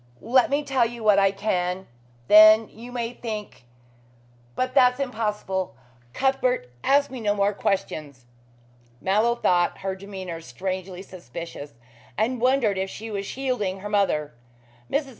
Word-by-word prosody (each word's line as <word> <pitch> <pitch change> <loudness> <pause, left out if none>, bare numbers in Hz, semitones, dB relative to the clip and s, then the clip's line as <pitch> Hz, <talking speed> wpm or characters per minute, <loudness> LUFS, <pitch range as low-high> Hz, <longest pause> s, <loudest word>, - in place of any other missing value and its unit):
Let 255 +1 +4
me 285 +2 +1
tell 260 -4 +2
you 235 -1 -8
what 210 -2 +5
I 195 0 +5
can. 190 -2 -2 0.4
Then 215 +1 +8
you 240 +2 -11
may 240 -1 -3
think 215 - -7 0.9
but 255 0 -1
that's 250 -1 +4
impossible. 210 - -2 0.4
Cuthbert, 255 - 0
ask 280 0 +3
me 260 - -6
no 205 -2 0
more 200 0 +2
questions." 150 -10 -3 0.7
Mallow 215 +5 +2
thought 175 -6 +1
her 195 0 -2
demeanor 190 -4 -7
strangely 185 +1 -5
suspicious, 165 -5 -9 0.4
and 235 +2 0
wondered 250 -6 +2
if 190 0 -2
she 220 +3 -8
was 200 -1 -4
shielding 245 -8 -2
her 205 - -5
mother. 190 -9 +1 0.6
Mrs. 280 -1 -1
210 Hz, 140 wpm, -24 LUFS, 190-245 Hz, 0.9 s, Then